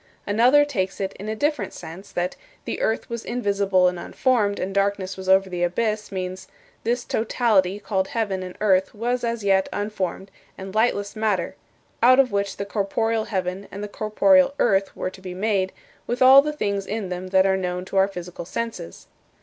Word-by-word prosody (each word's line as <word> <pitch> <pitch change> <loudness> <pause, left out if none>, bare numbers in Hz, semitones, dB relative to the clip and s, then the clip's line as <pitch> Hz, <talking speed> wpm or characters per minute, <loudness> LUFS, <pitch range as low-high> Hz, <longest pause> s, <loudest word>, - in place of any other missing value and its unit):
Another 245 +8 +5
takes 195 -10 -2
it 195 -1 -2
in 205 +2 -5
a 220 - -2
different 290 -4 -1
sense, 175 +5 -10
that 175 +1 -1
"But - - -23
the - - -4
earth 220 - 0
was 235 -1 -5
invisible 200 -6 +1
and 180 -1 -1
unformed, 215 -2 +1
and 190 +1 -3
darkness 195 -1 0
was 190 0 -6
over 190 0 +5
the 180 -2 -4
abyss" 210 +4 -1
means, 185 -1 -5 0.4
"This 240 +2 -1
totality 210 -4 +1
called 190 -2 -1
heaven 205 -5 -2
and 185 -1 -8
earth 190 -1 +2
was 245 +3 -1
as 235 -2 -2
yet 195 -1 +2
unformed 195 -2 -3 0.3
and 190 0 -8
lightless 215 -2 +1
matter, 210 -5 0 0.5
out 255 +3 +6
of 265 -2 +4
which 200 -1 -1
the 200 - -3
corporeal 220 +2 -1
heaven 190 0 -3
and 200 +1 -6
the - - -3
corporeal 275 +7 +3
earth 195 -3 +2
were 185 - -3
to 190 - -14
be 185 -1 -7
made, 195 -1 0 0.4
with 240 +1 -2
all 265 +2 +9
the 300 +1 -2
things 200 -9 -2
in 210 -2 -3
them 180 +1 -5
that 190 0 +4
are 190 0 +3
known 180 -1 -3
to 195 - -4
our 190 0 +5
physical 180 -3 -7
senses." 225 - -5
200 Hz, 190 wpm, -23 LUFS, 190-225 Hz, 0.5 s, all